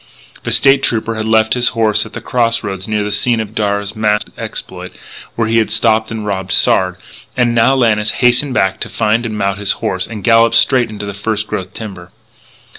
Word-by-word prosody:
The - - -4
State 135 0 +4
Trooper 115 -3 -1
had 110 0 -4
left 110 0 +3
his 125 -1 +2
horse 110 -2 +2
at - - -17
the - - -7
cross 115 -2 0
roads 95 -2 -4
near 105 -1 -1
the 105 - -3
scene 120 +2 +1
of 110 -1 -5
Darragh's 100 -1 -2
masked 105 -1 0
exploit, - - -6 0.5
where 115 -1 0
he 115 +1 +2
had 110 - 0
stopped 110 -1 +1
and 110 -2 -5
robbed 95 -2 -3
Sard 90 -1 +3 0.4
and 120 -2 +2
now 115 +3 +3
Lannis 110 -5 +1
hastened 125 +2 +1
back 95 0 +1
to - - -5
find 115 +2 0
and 110 -1 -5
mount 100 -1 -1
his 100 -1 0
horse, 95 0 -3
and 110 -4 -8
gallop 115 0 +4
straight 125 -3 +3
into 105 -1 -7
the 100 - -5
first 105 +1 -3
growth 95 -2 -6
timber. 95 -5 -9
110 Hz, 205 wpm, -15 LUFS, 100-115 Hz, 0.5 s, State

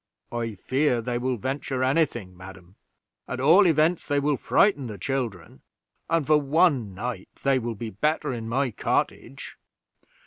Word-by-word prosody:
"I 115 -2 -3
fear 130 +5 0
they 120 +1 -2
will 125 0 -1
venture 130 +2 -3
any 150 +5 +3
thing, 95 -8 -10
madam. 95 0 -13 0.5
At 130 - -4
all 170 +9 +6
events, 160 +1 +2
they 145 -1 +1
will 145 +1 +1
frighten 145 -1 +2
the 105 -3 -7
children, 110 -6 -4 0.5
and 165 -3 +1
for 150 0 +4
one 140 - +2
night 105 -2 -5
they 135 -1 +3
will 115 -1 -4
be 110 +1 -6
better 150 +6 -1
in 115 -2 -5
my 130 +1 0
cottage." 70 - -3
130 Hz, 160 wpm, -25 LUFS, 110-145 Hz, 0.5 s, all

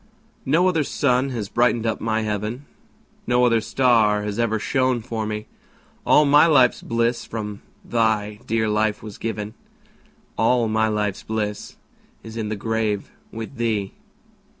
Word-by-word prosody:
No 165 +7 +4
other 165 -4 +2
sun 130 -1 +1
has 115 -6 -4
brightened 120 +1 +1
up 110 - -1
my 110 0 0
heaven, 105 +5 -3 0.6
No 125 +1 +3
other 115 -2 +3
star 110 -3 +2
has 105 +1 -4
ever 115 -2 +1
shone 130 +2 +1
for 110 -2 -4
me; 105 0 -4 0.6
All 150 - +6
my 145 +3 +6
life's 130 -6 +4
bliss 115 +1 0
from 105 -2 -6 0.2
thy 110 -3 0
dear 110 -1 +1
life 105 0 0
was 105 -2 -9
given, 110 -1 -4 0.9
All 115 +1 +3
my 110 0 +1
life's 105 -2 -1
bliss 105 -2 -4 0.5
is 110 0 -9
in 110 -2 -3
the 110 - -2
grave 110 -1 -2 0.2
with 115 +4 -7
thee. 110 -4 -1
110 Hz, 150 wpm, -22 LUFS, 105-120 Hz, 0.9 s, All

